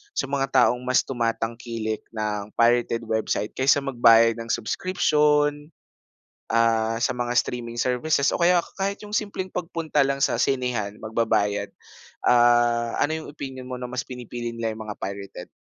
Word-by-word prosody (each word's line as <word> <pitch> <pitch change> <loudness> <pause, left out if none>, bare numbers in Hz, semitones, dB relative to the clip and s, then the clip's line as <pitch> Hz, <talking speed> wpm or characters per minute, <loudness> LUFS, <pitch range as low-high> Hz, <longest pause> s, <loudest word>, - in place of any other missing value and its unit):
sa 140 - -2
mga 135 -1 0 0.2
taong 125 - +2
mas 125 0 +2
tumatangkilik 115 -2 -3 0.2
ng 105 -1 -3
pirated 120 0 +2
website 110 -1 -1
kaysa 135 +2 +2
magbayad 115 -3 +5
ng 115 - -6
subscription, 150 - +1 0.8
ah, 115 -1 +2
sa - - +2
mga 120 0 -2
streaming 120 -1 -1
services 140 +4 +1
o - - -1
kaya 175 0 +4 0.2
kahit 200 +1 -2
yung 210 0 -5
simpleng 195 -3 -4
pagpunta 165 -5 -1
lang 135 0 -1
sa - - +2
sinehan, 120 -6 -1
magbabayad. 105 -2 0 0.5
Ah, 120 -1 +3
ano 155 - +2
yung - - -10
opinyon 130 -3 -7
mo 125 0 -6
na 125 - -4
mas 125 0 -3
pinipili 120 -2 -6
nila 115 -1 -2
yung 110 - -7
mga 105 - -6
pirated? 100 -2 -6
120 Hz, 150 wpm, -24 LUFS, 115-140 Hz, 0.8 s, magbayad